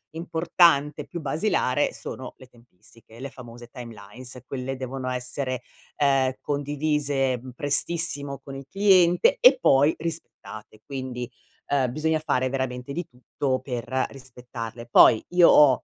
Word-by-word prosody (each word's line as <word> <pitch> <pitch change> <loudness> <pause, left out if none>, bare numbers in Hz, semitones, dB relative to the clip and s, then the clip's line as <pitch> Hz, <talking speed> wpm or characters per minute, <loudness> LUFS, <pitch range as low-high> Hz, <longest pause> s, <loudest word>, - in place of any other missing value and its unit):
importante, 165 -3 +2
più 170 -2 -7
basilare? 145 -2 0
Sono 130 -1 -7
le 130 - -15
tempistiche, 115 -1 -20
le 135 +1 -6
famose 120 -2 -12
timelines, 120 +2 -11
quelle 135 0 -4
devono 130 0 -6
essere, 125 0 -3 0.4
ehm, 135 -3 +2
condivise, 145 -2 -1
mhmm, 125 +1 -11
prestissimo 145 +1 -1
con 135 - -9
il 135 -1 -8
cliente 195 - +4
e - - +6
poi 140 +3 +4
rispettate, 130 -10 -8
quindi, 130 -3 -6 0.4
uhm, 135 -3 +1
bisogna 155 +3 0
fare 130 -4 0
veramente 130 0 -4
di 175 +5 -4
tutto 130 +1 -3
per 130 0 -3
rispettarle. 120 -3 -9
Poi 110 -1 +6
io 175 -1 +6
ho 135 -5 +5
135 Hz, 130 wpm, -25 LUFS, 125-150 Hz, 0.4 s, e